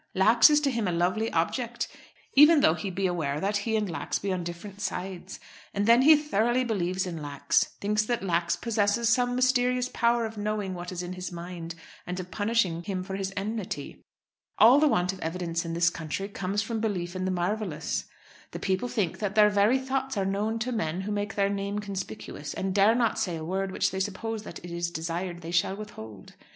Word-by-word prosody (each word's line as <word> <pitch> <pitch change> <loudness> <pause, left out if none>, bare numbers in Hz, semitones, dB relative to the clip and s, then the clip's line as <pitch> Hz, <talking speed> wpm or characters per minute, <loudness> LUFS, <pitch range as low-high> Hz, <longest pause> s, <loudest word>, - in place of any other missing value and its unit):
Lax 220 +9 +6
is 300 0 +5
to 280 -2 +1
him 230 -5 -1
a - - +1
lovely 185 +6 0
object, 235 +8 -1 0.5
even 300 +2 +7
though 160 - +5
he 195 +3 -4
be 190 +1 -2
aware 155 -6 -1
that 200 +4 0
he 220 +2 -1
and 215 -1 +1
Lax 170 - -2
be 195 -1 -2
on 180 -1 -2
different 180 +4 -8
sides. 185 -1 -5 0.4
And 200 +1 +1
then 235 +3 +6
he 310 +4 +8
thoroughly 255 -4 +1
believes 185 -5 -1
in 170 -3 -5
Lax; 145 -1 +1
thinks 210 +1 +1
that 240 -2 -1
Lax 170 -2 +1
possesses 230 0 +1
some 245 +1 +2
mysterious 250 0 +2
power 235 0 +2
of 220 -1 -6
knowing 205 -2 -2
what 180 0 -6
is 180 -1 -4
in 175 +1 -5
his 185 0 -6
mind, 170 -1 -7 0.3
and 180 +1 -3
of 180 0 -7
punishing 205 -6 +1
him 185 0 -3
for 190 +1 -5
his 195 0 -3
enmity. 200 -8 -4 0.5
All 240 +6 +8
the 305 - +5
want 180 -7 +1
of 190 - -10
evidence 170 0 -3
in 165 0 -3
this 170 +1 +3
country 165 +4 -4
comes 200 +1 -2
from 225 +1 -3
belief 185 -5 -2
in 185 0 -2
the - - 0
marvellous. 180 -2 -2 0.5
The - - -5
people 190 +5 0
think 200 -9 -1
that 205 -1 -2
their 210 -1 +6
very 205 +5 +4
thoughts 265 -1 -2
are 195 - +1
known 205 +3 -1
to 250 +3 -1
men 175 -6 -2
who 205 +2 -4
make 205 0 -2
their 200 -1 +2
name 200 0 -2
conspicuous, 195 -7 -6
and 190 0 -2
dare 205 +3 +5
not 235 -2 +1
say 175 -3 -1
a 160 -1 -5
word 190 +2 -2
which - - 0
they 190 - -3
suppose 210 +3 -3
that 170 - -8
it 175 - -8
is 170 0 -2
desired 175 +1 -4
they 165 0 -6
shall 175 +2 +1
withhold. 110 - -10
195 Hz, 210 wpm, -27 LUFS, 175-220 Hz, 0.5 s, he